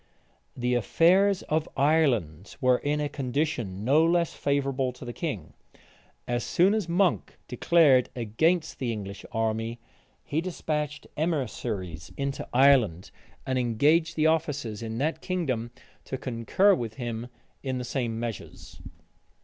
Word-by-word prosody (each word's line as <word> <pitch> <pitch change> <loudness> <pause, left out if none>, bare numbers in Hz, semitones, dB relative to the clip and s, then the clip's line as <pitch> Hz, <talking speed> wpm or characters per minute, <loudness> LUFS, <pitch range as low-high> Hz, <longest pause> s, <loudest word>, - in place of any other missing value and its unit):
The 125 0 0
affairs 185 - +3
of 155 0 -1
Ireland 125 - +1
were 125 -1 +3
in 150 +1 -1
a 150 - 0
condition 125 -8 -2
no 145 +5 +5
less 170 0 +2
favorable 135 -2 0
to 125 - -11
the 120 - -6
king. 120 - -5 0.7
As 120 0 -1
soon 185 +4 +3
as 210 -6 -1
Monk 180 +1 +1
declared 135 0 +4
against 155 +9 0
the 125 -3 -1
English 100 -3 -6
army, 115 +1 -2 0.4
he 155 +3 -1
despatched 150 -4 -3
emissaries 115 - -3
into 140 0 -3
Ireland, 125 -10 +4 0.3
and 130 -1 0
engaged 150 +8 +2
the 155 - +1
officers 145 -9 0
in 115 0 -5
that 150 +6 -1
kingdom 135 -11 -2 0.4
to 130 - -4
concur 130 - +2
with 115 - -3
him 120 -2 -4 0.3
in 130 -2 -3
the 125 - -3
same 120 -3 -2
measures. 115 -4 -7
130 Hz, 135 wpm, -27 LUFS, 115-160 Hz, 0.7 s, no